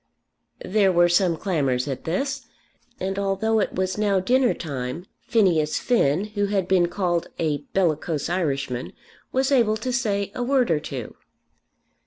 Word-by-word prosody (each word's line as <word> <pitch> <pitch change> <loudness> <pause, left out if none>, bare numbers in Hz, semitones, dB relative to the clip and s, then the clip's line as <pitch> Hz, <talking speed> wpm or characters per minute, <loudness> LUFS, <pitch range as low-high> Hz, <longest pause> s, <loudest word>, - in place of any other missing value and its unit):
There 195 -1 +3
were 175 -1 +4
some 175 -1 +2
clamours 140 -9 0
at 135 -2 -5
this; 275 - -2 0.5
and 195 +1 -2
although 200 +3 +1
it - - -1
was 185 +2 -1
now 200 -2 +2
dinner 250 +6 +2
time 140 +1 -5 0.2
Phineas 180 -11 +2
Finn, 190 - +2
who 205 -1 0
had 195 -3 0
been 185 -2 +3
called 175 -2 -1
a 155 -3 0
bellicose 160 -4 0
Irishman, 140 -8 -2 0.4
was 265 +1 +1
able 230 -5 +3
to 250 +3 -3
say 205 -5 -1
a - - -4
word 250 -3 +2
or 155 - +2
two. 130 -6 -6
185 Hz, 150 wpm, -24 LUFS, 160-215 Hz, 0.5 s, were